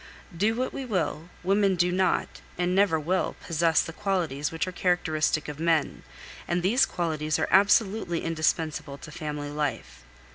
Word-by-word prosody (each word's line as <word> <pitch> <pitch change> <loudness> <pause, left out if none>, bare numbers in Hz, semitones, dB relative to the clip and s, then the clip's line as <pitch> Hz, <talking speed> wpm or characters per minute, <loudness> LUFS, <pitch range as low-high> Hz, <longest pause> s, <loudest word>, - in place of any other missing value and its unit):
Do 210 +6 +1
what 255 +2 -2
we 270 - -4
will, 180 -7 -2
women 195 +1 +3
do 175 0 +2
not, 185 +1 0 0.2
and 180 0 0
never 190 -4 +3
will, 180 +5 -1
possess 165 -1 +2
the 165 - -7
qualities 170 -8 -1
which 165 0 -1
are - - -3
characteristic 160 -4 0
of 150 0 -7
men, 165 -2 +1 0.5
and 175 0 0
these 235 +8 +4
qualities 155 -3 -1
are - - 0
absolutely 200 -2 +3
indispensable 155 -3 -1
to 150 - -11
family 150 -1 -5
life. 145 - -4
170 Hz, 155 wpm, -27 LUFS, 155-190 Hz, 0.5 s, these